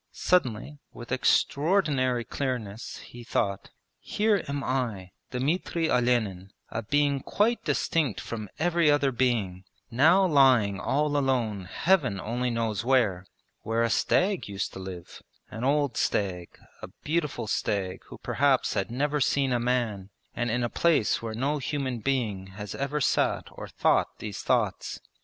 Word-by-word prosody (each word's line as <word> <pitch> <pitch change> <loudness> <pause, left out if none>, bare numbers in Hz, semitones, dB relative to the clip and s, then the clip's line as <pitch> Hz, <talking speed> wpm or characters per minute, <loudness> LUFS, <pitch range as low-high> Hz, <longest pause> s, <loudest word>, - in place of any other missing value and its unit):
Suddenly, 145 -4 0
with 120 - -11
extraordinary 140 -2 +2
clearness, 120 -5 -4
he 120 0 -11
thought: 100 -3 -2 0.3
'Here 210 -2 +1
am 140 0 -3
I, 115 -8 -2 0.2
Dmitri 160 +5 -1
Olenin, 110 -7 +1 0.2
a 110 - -2
being 145 +4 +1
quite 220 - 0
distinct 150 -10 0
from 110 -3 -6
every 170 -1 +2
other 145 -2 +3
being, 115 -8 0 0.3
now 165 +11 +5
lying 130 - +4
all 145 +1 0
alone 120 -8 0
Heaven 135 - +1
only 125 +4 -2
knows 115 -2 -1
where 110 -8 +2 0.3
where 115 +1 0
a 115 - +1
stag 190 - +1
used 100 -1 -4
to - - -8
live 95 -2 -9 0.3
an 110 +2 -6
old 140 -3 +1
stag, 90 -4 -1 0.2
a - - -6 0.2
beautiful 150 -5 -1
stag 100 -3 -2
who - - -11
perhaps 140 -2 +1
had 95 -2 -1
never 145 +4 -1
seen 135 -1 +2
a 120 - +1
man, 120 -6 -1 0.3
and 120 0 -1
in 120 +2 0
a - - +1
place 160 -10 +2
where 115 -1 -5
no 140 +5 0
human 135 -3 -2
being 110 -7 -1
has 105 -1 -6
ever 145 +2 -2
sat - - +1
or - - -8
thought - - +1
these 105 -3 -6
thoughts. - - 0
125 Hz, 145 wpm, -27 LUFS, 110-145 Hz, 0.3 s, now